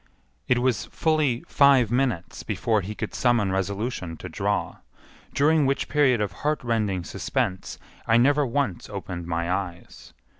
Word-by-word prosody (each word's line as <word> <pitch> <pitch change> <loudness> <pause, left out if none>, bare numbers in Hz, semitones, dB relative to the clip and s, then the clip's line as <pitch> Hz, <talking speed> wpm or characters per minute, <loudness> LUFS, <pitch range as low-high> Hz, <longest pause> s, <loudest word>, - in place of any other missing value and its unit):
It 125 - +3
was 120 -5 0
fully 155 -7 0
five 135 -6 +4
minutes 120 -9 -1
before 110 +1 0
he 105 +3 -6
could - - -5
summon 120 -6 +2
resolution 95 -2 -3
to - - -8
draw, - - -2 0.5
during 150 0 +3
which 140 +1 0
period 140 -5 +3
of 105 -2 -1
heartrending 115 - 0
suspense 95 +3 -3 0.3
I 115 - +5
never 145 +4 +4
once 135 -8 -2
opened 90 -4 -6
my 85 +1 -1
eyes. 90 -2 -5
115 Hz, 140 wpm, -25 LUFS, 95-135 Hz, 0.5 s, I